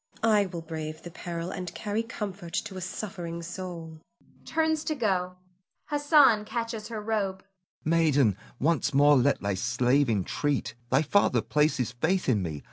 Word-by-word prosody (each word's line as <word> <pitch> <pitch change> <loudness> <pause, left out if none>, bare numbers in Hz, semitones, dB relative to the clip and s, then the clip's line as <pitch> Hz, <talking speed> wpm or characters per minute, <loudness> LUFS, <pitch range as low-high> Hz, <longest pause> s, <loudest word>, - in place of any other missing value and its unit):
I 210 -3 +4
will 170 -2 -6
brave 155 -1 -6
the 175 - -8
peril, 170 +1 -5
and 180 -3 -6
carry 210 +1 -1
comfort 200 -6 -6
to 190 - -3
a 185 - -5
suffering 180 -3 -5
soul 165 -3 -7 0.4
[turns 315 -1 +1
to 310 - -1
go; 185 -7 0 0.5
Hassan 290 -7 +5
catches 230 -1 -4
her 225 -2 -5
robe]. 205 -3 -2 0.4
Hassan. - - -2
Maiden! 145 - +3 0.2
once 150 -1 +1
more 145 +1 +6
let 140 +2 +3
thy 100 0 0
slave 120 +6 +2
entreat. 115 +7 -1 0.2
Thy 135 +5 +3
father 200 +7 +3
places 150 -6 +1
faith 160 +10 0
in 115 -7 +3
me. 80 -5 -4
170 Hz, 155 wpm, -28 LUFS, 145-210 Hz, 0.5 s, more